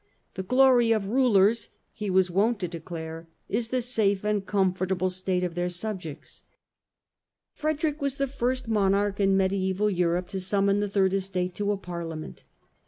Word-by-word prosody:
The 190 - -4
glory 250 +2 +4
of 200 -3 -2
Rulers," 230 -3 +3 0.2
he 210 -2 -5
was 185 -1 +3
wont 210 +5 +2
to 180 - -1
declare, 165 -1 -7
" - - -45
is 230 -1 -1
the 255 +1 -1
safe 210 -5 +1
and 210 -2 0
comfortable 185 -2 0
state 185 0 -1
of 175 -2 -2
their 175 +1 -1
subjects." 180 -4 -6 1.1
Frederick 310 0 -2
was 280 -1 -1
the 275 - 0
first 255 -2 -2
monarch 200 -1 +1
in 195 -1 +3
mediaeval 190 +1 +1
Europe 175 -1 0
to 195 - -4
summon 200 +1 +1
the 205 0 -1
Third 195 -1 +2
Estate 185 -2 -2
to 205 +2 -1
a 205 - -1
Parliament. 170 -4 -7
195 Hz, 165 wpm, -26 LUFS, 180-220 Hz, 1.1 s, glory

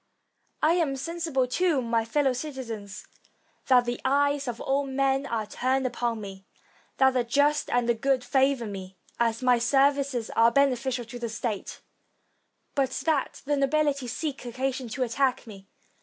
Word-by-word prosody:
I 315 +2 +5
am 325 -6 +1
sensible, 325 -2 -1
too, 325 +3 +1
my 230 -2 0
fellow 270 +3 +1
citizens, 240 -8 -6 0.6
that 250 -2 +5
the 240 0 -3
eyes 285 +1 +1
of 235 -1 -4
all 275 +1 0
men 270 +1 0
are 225 -4 -2
turned 260 +5 -1
upon 240 -2 -1
me; 195 -2 -9 0.5
that 265 -1 +5
the 255 -1 +1
just 285 +5 +2
and 235 -2 +1
good 270 -2 +2
favor 265 -1 +2
me, 190 -2 -8 0.2
as 230 +1 0
my 250 -1 +4
services 270 -1 +2
are 230 +1 +4
beneficial 260 -2 +1
to 240 +2 -9
the 235 -1 -3
state, 220 -2 -4 0.9
but 275 -3 +1 0.2
that 305 -4 0
the 290 +1 +1
nobility 280 -1 +1
seek 280 +3 -4
occasion 255 +1 -3
to 255 +4 -2
attack 255 +2 0
me. 195 -3 -12
260 Hz, 155 wpm, -27 LUFS, 235-275 Hz, 0.9 s, I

